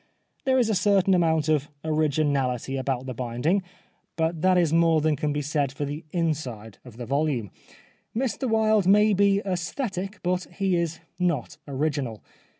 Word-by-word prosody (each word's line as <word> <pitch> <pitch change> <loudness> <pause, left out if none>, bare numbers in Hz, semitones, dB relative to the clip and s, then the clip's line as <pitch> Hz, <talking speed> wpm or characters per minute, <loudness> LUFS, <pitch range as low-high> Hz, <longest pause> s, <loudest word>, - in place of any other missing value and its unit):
There 260 -1 +3
is 245 -3 +3
a 220 - +1
certain 195 -1 +3
amount 160 -4 +2
of 150 -2 +1 0.2
originality 145 -5 0
about 130 -1 -2
the 130 - -4
binding, 125 - 0 0.5
but 160 0 -1
that 185 0 +4
is 170 -3 +2
more 165 -1 +4
than 155 0 +2
can 150 +1 -1
be 145 0 -2
said 145 -2 0
for 145 +2 -4
the 145 +3 -5
inside 140 - -3
of 110 - -13
the 120 - -6
volume. 135 - -1 0.7
Mr 260 +1 -1
Wilde 220 -3 +3
may 210 +2 +5
be 200 +1 +3
aesthetic, 195 +2 -3
but 180 0 0
he 195 -2 +1
is 170 -1 -2 0.2
not 170 -8 -1
original. 140 -5 -2
160 Hz, 160 wpm, -25 LUFS, 140-190 Hz, 0.7 s, may